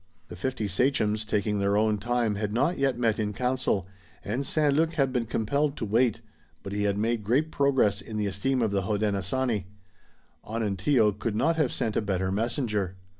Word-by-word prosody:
The 90 Hz, -, -8 dB
fifty 110 Hz, +2 st, -2 dB
sachems, 110 Hz, 0 st, +1 dB
taking 105 Hz, -1 st, 0 dB
their 100 Hz, +1 st, +2 dB
own 105 Hz, -1 st, +2 dB
time, 120 Hz, 0 st, 0 dB
had 105 Hz, 0 st, -2 dB
not 140 Hz, +10 st, +1 dB
yet 135 Hz, -3 st, +1 dB
met 115 Hz, -2 st, +1 dB
in 105 Hz, -1 st, -1 dB
council, 125 Hz, -5 st, 0 dB, 0.4 s
and 120 Hz, +7 st, -1 dB
St. 150 Hz, -2 st, +2 dB
Luc 160 Hz, +3 st, +2 dB
had 135 Hz, -4 st, +1 dB
been 120 Hz, -3 st, 0 dB
compelled 140 Hz, +7 st, 0 dB
to 115 Hz, -, -3 dB
wait, 115 Hz, +2 st, +2 dB, 0.4 s
but 100 Hz, -, -6 dB
he 105 Hz, 0 st, 0 dB
had 100 Hz, -1 st, +1 dB
made 115 Hz, +1 st, 0 dB
great 135 Hz, +9 st, +1 dB
progress 130 Hz, -9 st, +2 dB
in 110 Hz, +1 st, -7 dB
the 105 Hz, -, 0 dB
esteem 115 Hz, +6 st, 0 dB
of 110 Hz, -, +1 dB
the 100 Hz, -1 st, +1 dB
Hodenosaunee. 105 Hz, +2 st, -1 dB, 0.8 s
Onontio 110 Hz, +1 st, +1 dB
could 105 Hz, +2 st, -3 dB
not 165 Hz, +9 st, +2 dB
have 150 Hz, -6 st, +2 dB
sent 110 Hz, -2 st, -2 dB
a -, -, +2 dB
better 95 Hz, -2 st, -1 dB
messenger. 105 Hz, -, -1 dB
110 Hz, 185 wpm, -27 LUFS, 100-130 Hz, 0.8 s, their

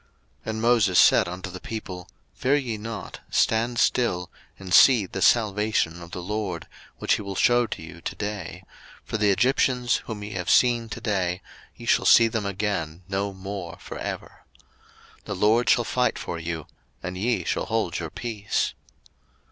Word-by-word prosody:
02:014:013 -, -, -5 dB
And 110 Hz, 0 st, -3 dB
Moses 115 Hz, -6 st, +4 dB
said -, -, +6 dB
unto 90 Hz, +2 st, -6 dB
the 90 Hz, -, -8 dB
people, 95 Hz, -5 st, -7 dB, 0.2 s
Fear 135 Hz, +3 st, +1 dB
ye 125 Hz, -6 st, -2 dB
not, 110 Hz, -1 st, -7 dB
stand 115 Hz, +2 st, +1 dB
still, 90 Hz, -9 st, +1 dB, 0.3 s
and 95 Hz, -2 st, -6 dB
see 120 Hz, -7 st, +7 dB
the 95 Hz, +1 st, -6 dB
salvation 105 Hz, -6 st, +2 dB
of 85 Hz, -, -10 dB
the 90 Hz, -, -6 dB
LORD, 100 Hz, -3 st, -3 dB, 0.3 s
which -, -, +1 dB
he -, -, -6 dB
will 100 Hz, -1 st, -6 dB
shew 120 Hz, +3 st, +3 dB
to 80 Hz, -, -6 dB
you 80 Hz, +1 st, -11 dB
to -, -, -5 dB
day: 100 Hz, -4 st, -5 dB, 0.4 s
for 110 Hz, -, -3 dB
the 105 Hz, -1 st, +3 dB
Egyptians 125 Hz, +3 st, +2 dB
whom 105 Hz, -3 st, -5 dB
ye 105 Hz, -, -6 dB
have 90 Hz, -3 st, -3 dB
seen 120 Hz, -2 st, +4 dB
to 120 Hz, -, -6 dB
day, 95 Hz, -4 st, -1 dB, 0.4 s
ye -, -, -11 dB
shall -, -, +3 dB
see 115 Hz, -, +7 dB
them 110 Hz, -3 st, -2 dB
again 95 Hz, -4 st, -3 dB
no 100 Hz, +1 st, -1 dB
more 95 Hz, -2 st, -7 dB
for -, -, -8 dB
ever. -, -, -6 dB, 0.8 s
02:014:014 -, -, -34 dB
The 100 Hz, -, -4 dB
LORD 110 Hz, +5 st, +3 dB
shall 120 Hz, -, +4 dB
fight 125 Hz, +2 st, 0 dB
for 85 Hz, -, -5 dB
you, 80 Hz, -1 st, -4 dB, 0.4 s
and 90 Hz, -1 st, -4 dB
ye 105 Hz, 0 st, 0 dB
shall -, -, -1 dB
hold -, -, -1 dB
your -, -, -4 dB
peace. 105 Hz, -4 st, -2 dB
105 Hz, 180 wpm, -25 LUFS, 90-115 Hz, 0.8 s, see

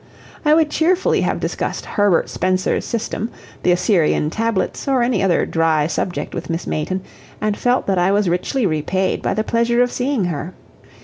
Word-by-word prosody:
I 300 Hz, 0 st, +5 dB
would 315 Hz, -2 st, +2 dB
cheerfully 355 Hz, +4 st, +2 dB
have -, -, 0 dB
discussed -, -, -3 dB
Herbert 205 Hz, -4 st, +2 dB
Spencer's 185 Hz, +1 st, 0 dB
system, 230 Hz, -1 st, -3 dB, 0.3 s
the 180 Hz, -, +3 dB
Assyrian 175 Hz, -4 st, +2 dB
Tablets, 225 Hz, 0 st, -1 dB
or 265 Hz, -3 st, +3 dB
any 240 Hz, -5 st, +1 dB
other 190 Hz, -3 st, +2 dB
dry 160 Hz, -2 st, +1 dB
subject 175 Hz, +2 st, -3 dB
with -, -, -5 dB
Miss 165 Hz, +1 st, -2 dB
Mayton, 185 Hz, +5 st, -2 dB, 0.4 s
and 210 Hz, -1 st, 0 dB
felt 245 Hz, +3 st, +1 dB
that 190 Hz, -2 st, +1 dB
I 180 Hz, +2 st, +3 dB
was 205 Hz, -1 st, +2 dB
richly 180 Hz, +8 st, 0 dB
repaid 185 Hz, +3 st, 0 dB
by -, -, -1 dB
the 215 Hz, -, 0 dB
pleasure 235 Hz, +2 st, +2 dB
of 245 Hz, -, -1 dB
seeing 250 Hz, -5 st, 0 dB
her. 170 Hz, +1 st, -4 dB
200 Hz, 175 wpm, -19 LUFS, 175-240 Hz, 0.4 s, I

